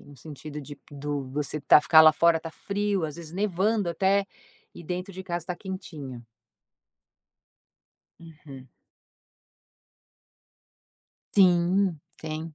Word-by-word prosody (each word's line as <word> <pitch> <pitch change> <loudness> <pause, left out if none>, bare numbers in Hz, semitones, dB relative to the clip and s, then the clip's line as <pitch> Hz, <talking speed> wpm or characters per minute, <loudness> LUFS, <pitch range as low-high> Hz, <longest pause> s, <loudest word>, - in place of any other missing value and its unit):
No 145 - -16
sentido 150 +2 -9
de 145 +1 -10
do 145 0 -4
você 150 +2 -3
tar 150 - +6
ficar 160 +1 +6
lá 155 0 +8
fora, 170 0 +3
tá 165 - -7
frio, 200 +1 -2
às 150 -2 -5
vezes 165 -1 -9
nevando 200 +1 0
até, 195 +3 +1 0.5
e - - -10
dentro 180 +3 -5
de 190 +1 -8
casa 175 -3 -4
está 180 - -4
quentinho. 160 -10 -8 2.0
Uhum. 150 -5 -13 2.7
Sim, 180 -1 +3 0.2
tem. 155 0 -6
165 Hz, 115 wpm, -26 LUFS, 150-185 Hz, 2.7 s, lá